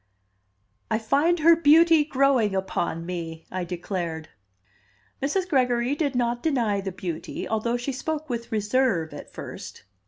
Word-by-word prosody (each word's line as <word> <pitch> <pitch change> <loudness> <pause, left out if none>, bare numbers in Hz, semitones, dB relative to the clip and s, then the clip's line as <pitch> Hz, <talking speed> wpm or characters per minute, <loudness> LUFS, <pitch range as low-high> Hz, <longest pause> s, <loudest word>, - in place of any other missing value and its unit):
"I 220 - +2
find 290 +10 +1
her 335 +2 +7
beauty 325 0 +6
growing 265 -8 +2
upon 170 -3 -2
me?" 165 -2 -6
I 185 0 -2
declared. 170 -2 -4 0.9
Mrs. 360 +7 0
Gregory 250 -3 +2
did 290 -3 -1
not 240 0 0
deny 235 -10 +1
the 190 0 -4
beauty, 175 -3 -5
although 230 +2 0
she 245 +3 -3
spoke 310 +4 -4
with 235 -3 -5
reserve 210 -6 +1
at - - -10
first. - - -9
240 Hz, 135 wpm, -25 LUFS, 190-285 Hz, 0.9 s, her